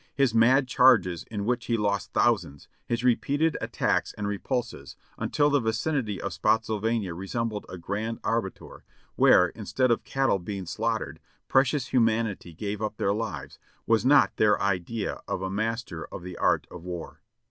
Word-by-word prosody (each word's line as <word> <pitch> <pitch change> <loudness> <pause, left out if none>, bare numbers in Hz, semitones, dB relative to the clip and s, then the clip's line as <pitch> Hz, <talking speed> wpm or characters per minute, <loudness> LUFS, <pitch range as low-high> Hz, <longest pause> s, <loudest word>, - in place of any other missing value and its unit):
His 135 -4 +2
mad 125 +4 +4
charges 115 - +4
in 105 -2 -5
which 120 0 -1
he 115 - 0
lost 100 -1 -1
thousands, 70 0 0 0.2
his 120 0 -1
repeated 145 +6 +2
attacks - - 0
and 105 -1 -4
repulses, 110 - -4 0.2
until 145 0 +1
the 145 - +4
vicinity 110 -1 -1
of - - -4
Spottsylvania 110 -3 0
resembled 105 +4 -4
a 90 - -7
great 105 +6 -3
abattoir, 115 -4 -3 0.3
where, 90 0 +5
instead 120 +5 -1
of 115 - +1
cattle 135 -7 +1
being 95 +1 -5
slaughtered, 110 +5 -2 0.3
precious 135 +1 +2
humanity 115 -6 +1
gave 100 +5 -5
up 105 0 -3
their 100 - +1
lives, 110 +1 -5 0.3
was 115 -1 +2
not 140 +2 +5
their 105 -1 +4
idea 100 +3 -2
of 95 - -3
a 95 - -3
master 110 -5 -3
of - - -9
the 90 -1 -7
art - - +1
of 85 - -10
war. 90 -2 -7
110 Hz, 160 wpm, -27 LUFS, 100-120 Hz, 0.3 s, where